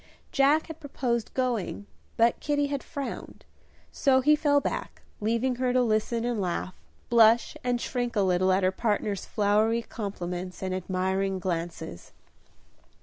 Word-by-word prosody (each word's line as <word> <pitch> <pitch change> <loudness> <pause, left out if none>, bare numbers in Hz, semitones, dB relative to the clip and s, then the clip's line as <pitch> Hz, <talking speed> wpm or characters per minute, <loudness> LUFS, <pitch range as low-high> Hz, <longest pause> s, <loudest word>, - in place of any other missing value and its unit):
Jack 285 +3 +3
had 320 -1 -9
proposed 245 -6 -2
going, 240 -6 -1 0.3
but 230 +1 +3
Kitty 290 -1 0
had 280 -1 -2
frowned, 280 -4 -7 0.5
so 265 -1 +3
he 300 +3 +5
fell 290 -1 +3
back, - - -4 0.2
leaving 235 +4 0
her 250 0 +1
to 255 - +4
listen 225 +1 0
and 240 -4 -1
laugh, 180 0 -2 0.4
blush 230 0 +5
and 245 -1 0
shrink 245 -1 -2
a 205 - +3
little 185 0 +2
at 190 +1 +2
her 185 - +3
partner's 205 -1 -1
flowery 215 +3 +2
compliments 180 -4 -5
and 185 0 -2
admiring 190 +1 -1
glances. 170 - -5
225 Hz, 145 wpm, -27 LUFS, 190-255 Hz, 0.5 s, he